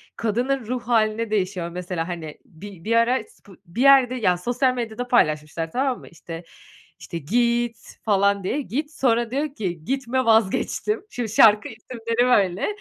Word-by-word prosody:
kadının 245 Hz, +3 st, -1 dB
ruh 250 Hz, +1 st, -2 dB
hâline 220 Hz, -1 st, +1 dB
değişiyor 185 Hz, -4 st, -1 dB
mesela, 175 Hz, -1 st, -4 dB
hani. 165 Hz, -4 st, -6 dB
Bi 180 Hz, +1 st, -12 dB
bir 230 Hz, +4 st, 0 dB
ara 230 Hz, +1 st, +3 dB
spo 195 Hz, -, -18 dB
bir 170 Hz, +8 st, -5 dB
yerde 265 Hz, -2 st, +6 dB
ya, 190 Hz, -8 st, +2 dB
sosyal 245 Hz, +7 st, +1 dB
medyada 240 Hz, 0 st, -4 dB
paylaşmışlar, 155 Hz, -7 st, +1 dB
tamam 260 Hz, +2 st, 0 dB
mı? -, -, -14 dB
İşte 165 Hz, 0 st, -9 dB, 0.6 s
işte, 170 Hz, -, -6 dB
git, 235 Hz, +7 st, 0 dB, 0.3 s
falan 200 Hz, -1 st, +2 dB
diye, 275 Hz, +10 st, -1 dB
"git" 290 Hz, +3 st, -4 dB
sonra 235 Hz, -5 st, +1 dB
diyor 285 Hz, +2 st, -2 dB
ki, 175 Hz, -, -4 dB
"Gitme, 260 Hz, 0 st, -1 dB
vazgeçtim." 225 Hz, -, +1 dB
Şimdi 240 Hz, -, -4 dB
şarkı 215 Hz, 0 st, +5 dB
isimleri 230 Hz, +1 st, -2 dB
böyle. 195 Hz, -6 st, +2 dB
225 Hz, 155 wpm, -23 LUFS, 185-245 Hz, 0.6 s, yerde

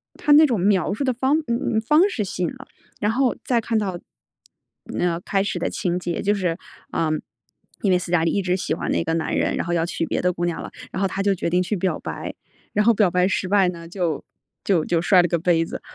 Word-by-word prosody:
它 295 Hz, -, 0 dB
那 310 Hz, +1 st, +8 dB
种 235 Hz, -9 st, 0 dB
描 195 Hz, -1 st, +2 dB
述 250 Hz, -, -2 dB
的 260 Hz, -, +2 dB
方 265 Hz, +6 st, +2 dB
嗯 235 Hz, -1 st, 0 dB
嗯， -, -, +2 dB
方 305 Hz, -, +4 dB
式 225 Hz, -, -2 dB
吸 180 Hz, -1 st, -4 dB
引 -, -, +1 dB
了。 270 Hz, +1 st, -12 dB, 0.3 s
然 210 Hz, +1 st, +1 dB
后 255 Hz, +1 st, +1 dB
再 240 Hz, -2 st, +2 dB
看 225 Hz, 0 st, -1 dB
到， 190 Hz, -4 st, -2 dB, 1.0 s
呃， 170 Hz, -1 st, +1 dB
开 195 Hz, +1 st, 0 dB
始 205 Hz, -, -2 dB
的 -, -, -1 dB
情 175 Hz, -1 st, -1 dB
节， 175 Hz, -1 st, -3 dB
就 205 Hz, +1 st, +2 dB
是 180 Hz, -3 st, -1 dB, 0.3 s
呃， 160 Hz, -1 st, 0 dB, 0.7 s
因 195 Hz, -, +2 dB
为 180 Hz, -, +5 dB
思 175 Hz, -, -6 dB
嘉 165 Hz, -2 st, +3 dB
丽 165 Hz, -, +2 dB
一 200 Hz, -, +1 dB
直 180 Hz, 0 st, 0 dB
喜 -, -, -2 dB
欢 -, -, -3 dB
那 -, -, +1 dB
个 165 Hz, -, -1 dB
男 160 Hz, -, -2 dB
人， -, -, +1 dB
然 -, -, -2 dB
后 175 Hz, -, -2 dB
要 165 Hz, -1 st, +1 dB
娶 170 Hz, -1 st, -2 dB
别 -, -, -1 dB
的 180 Hz, -, +2 dB
姑 175 Hz, +1 st, -2 dB
娘 170 Hz, -, -2 dB
了， -, -, -7 dB, 0.2 s
然 -, -, -3 dB
后 195 Hz, -, +3 dB
她 195 Hz, +1 st, -3 dB
就 200 Hz, -1 st, +3 dB
决 170 Hz, -, -2 dB
定 180 Hz, +1 st, +2 dB
去 210 Hz, -, -2 dB
表 185 Hz, +1 st, -1 dB
白， -, -, -6 dB, 0.4 s
然 210 Hz, +1 st, +2 dB
后 235 Hz, -, +6 dB
表 205 Hz, -4 st, +3 dB
白 180 Hz, 0 st, +3 dB
失 190 Hz, -1 st, -1 dB
败 195 Hz, -2 st, +4 dB
呢， 170 Hz, -1 st, -8 dB
就 170 Hz, -4 st, -2 dB, 0.4 s
就 175 Hz, -6 st, +2 dB
就 170 Hz, -1 st, +1 dB
摔 180 Hz, 0 st, +5 dB
了 175 Hz, -, +1 dB
个 170 Hz, -, +1 dB
杯 165 Hz, -1 st, +2 dB
子。 -, -, -7 dB
185 Hz, 280 characters per minute, -23 LUFS, 175-215 Hz, 1.0 s, 那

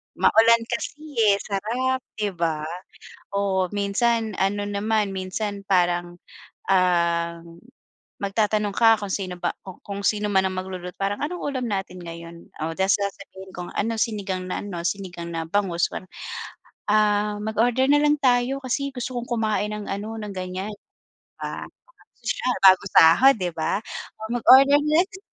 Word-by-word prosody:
maulan 230 Hz, +1 st, +5 dB
kasi 235 Hz, -, -3 dB, 0.4 s
eh, 200 Hz, -, 0 dB
sarap 240 Hz, +6 st, -1 dB, 0.2 s
'di 210 Hz, -2 st, -1 dB
ba. 160 Hz, -2 st, 0 dB, 0.7 s
Oo, 190 Hz, -2 st, +1 dB
minsan 215 Hz, +1 st, 0 dB
ano 200 Hz, +1 st, +1 dB
naman, 205 Hz, 0 st, 0 dB
minsan 200 Hz, +2 st, -4 dB
parang, 175 Hz, -1 st, +1 dB, 0.5 s
um, 170 Hz, -2 st, +1 dB, 0.6 s
magtatanong 205 Hz, 0 st, 0 dB
ka 225 Hz, -2 st, +5 dB
kung 205 Hz, -2 st, -6 dB
sino 185 Hz, -3 st, -4 dB
ba -, -, -2 dB
ku 190 Hz, -2 st, -10 dB
kung 200 Hz, 0 st, -6 dB
sino 210 Hz, 0 st, +1 dB
man 190 Hz, -1 st, +3 dB
ang 185 Hz, -, -2 dB
magluluto. 185 Hz, -1 st, -5 dB
Parang 200 Hz, +4 st, -2 dB
anong 350 Hz, +4 st, -3 dB
ulam 260 Hz, -4 st, -2 dB
natin 185 Hz, -2 st, -4 dB
ngayon 170 Hz, 0 st, -10 dB, 0.2 s
o 165 Hz, -, -4 dB
ta’s 190 Hz, +3 st, +2 dB
sasabihin 195 Hz, -1 st, -6 dB
kung 180 Hz, 0 st, -6 dB
ano, 225 Hz, +2 st, -1 dB
sinigang 200 Hz, -5 st, -2 dB
na -, -, -2 dB
ano, 180 Hz, -4 st, -5 dB
sinigang 175 Hz, -3 st, -4 dB
na 165 Hz, -1 st, -4 dB
bangus, 175 Hz, -1 st, +1 dB
ganun. 185 Hz, -, -8 dB, 0.8 s
“Ah, 210 Hz, 0 st, +2 dB
mag-order 240 Hz, +5 st, +1 dB
na 290 Hz, -, +6 dB
lang 295 Hz, 0 st, +3 dB
tayo 255 Hz, +1 st, +2 dB
kasi 275 Hz, +2 st, -2 dB
gusto 250 Hz, 0 st, -4 dB
kong 240 Hz, -, -3 dB
kumain 215 Hz, -2 st, 0 dB
ng 210 Hz, -1 st, -6 dB
ano, 205 Hz, +3 st, -4 dB
ng 210 Hz, -1 st, -6 dB
ganiyan.” 185 Hz, +2 st, -4 dB
‘Di 205 Hz, -, -13 dB, 0.4 s
ba. -, -, -5 dB, 0.5 s
Sosyal, 250 Hz, -, -1 dB
bagong 190 Hz, +1 st, +6 dB
sahod 225 Hz, +13 st, +7 dB
‘di 180 Hz, -3 st, -2 dB
ba, 160 Hz, +4 st, -1 dB, 0.6 s
mag-order 270 Hz, +4 st, +7 dB
next. 355 Hz, +6 st, +1 dB
200 Hz, 150 wpm, -24 LUFS, 185-225 Hz, 0.8 s, sahod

